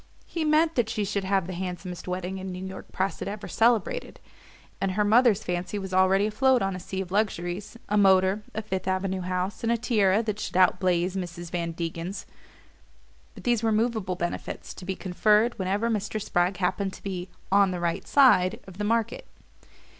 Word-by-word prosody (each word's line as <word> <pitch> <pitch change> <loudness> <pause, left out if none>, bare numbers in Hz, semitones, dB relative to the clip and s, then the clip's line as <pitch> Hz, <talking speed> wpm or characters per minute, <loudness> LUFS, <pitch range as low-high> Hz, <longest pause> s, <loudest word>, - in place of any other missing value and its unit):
He 330 - -3
meant 310 +1 +3
that 240 -5 +1
she 215 -2 -1
should 200 -1 -2
have 190 -2 +1
the 185 - -5
"handsomest" 180 -1 -5
wedding 180 +1 -3
the 190 - -7
New 185 0 -5
York 190 0 -9
press 190 +1 -1
had - - -4
ever 205 +1 -5
celebrated, 235 - +1 0.6
and 195 -1 0
her 210 +2 +2
mother's 220 0 +4
fancy 180 +3 -3
was 190 -2 -5
already 190 +2 +4
afloat 250 +3 +3
on 195 -1 -1
a - - -5
sea 190 +1 -4
of 180 -2 -7
luxuries 200 0 -2
a 210 0 +2
motor, 190 +1 +4
a 220 - -2
Fifth 190 -3 -3
Avenue 190 0 -1
house, 185 +2 -2
and 230 - +1
a 235 - +2
tiara 215 -3 +2
that 215 -2 -3
should 185 - -3
out 185 - +5
blaze 180 -1 +1
Mrs. 175 -2 -5
Van 170 -1 -2
Degen's; 170 +3 -4 1.1
but - - -11
these 240 -2 +2
were 225 -1 +1
movable 215 -4 0
benefits, 175 -1 -4
to 185 - -10
be 190 0 -2
conferred 210 +5 +2
whenever 195 +4 0
Mr. 215 -1 -1
Spragg 180 -2 0
happened 190 +1 -1
to - - -12
be 185 -2 -4 0.2
"on 200 0 +5
the 180 -1 -3
right 170 -1 -2
side" 225 -8 +5
of 190 0 -12
the - - -1
market. 230 - -1
195 Hz, 195 wpm, -26 LUFS, 185-215 Hz, 1.1 s, out